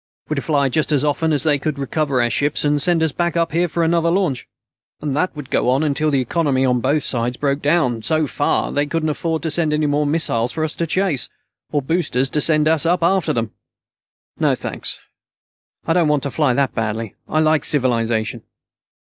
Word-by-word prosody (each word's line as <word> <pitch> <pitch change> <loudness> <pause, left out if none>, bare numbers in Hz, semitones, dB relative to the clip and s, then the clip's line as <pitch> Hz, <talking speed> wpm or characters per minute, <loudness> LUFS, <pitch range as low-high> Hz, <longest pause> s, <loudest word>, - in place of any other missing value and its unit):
We'd 150 -3 -2
fly 145 -3 +1
just 155 +4 0
as 145 -1 +2
often 160 +2 0
as 145 -3 +1
they 145 -3 +2
could 145 +1 -3
recover 140 -2 0
our 120 - +1
ships 145 +1 0
and 145 0 +2
send 170 0 +2
us 160 - +1
back 170 +2 -1
up 165 -1 +1
here 170 +3 +1
for 170 +1 -1
another 170 0 +2
launch. 170 -8 0 0.5
And 145 -2 -3
that 175 +3 -1
would 145 -2 -9
go - - +1
on 135 +4 +2
until 155 +1 +1
the 140 -3 +1
economy 135 0 0
on 125 -1 +2
both 145 +4 +1
sides 120 0 -2
broke 140 0 -1
down 145 -7 +1
so 155 +7 +1
far 145 +1 -1
they 145 +1 0
couldn't 155 0 -1
make 160 -1 -1
any 155 -2 +1
more 145 0 +1
missiles 125 -6 0
for 160 - -2
us 155 - -1
to 170 - -1
chase, 185 -6 +1 0.4
or 145 -2 0
boosters 135 -4 0
to 150 - +1
send 155 -1 +4
us 160 -1 +2
up 170 +1 +1
after 185 0 +2
them. 115 -2 -2 0.9
No - - +2
thanks. - - -5 0.9
I 165 - +1
don't 170 -2 +3
want 150 -2 +1
to 140 - -3
fly 145 -4 +1
that 140 -1 +1
badly. 110 -1 -3 0.2
I 155 - +1
like 155 -2 +2
civilization." 115 -5 0
150 Hz, 205 wpm, -19 LUFS, 135-160 Hz, 0.9 s, send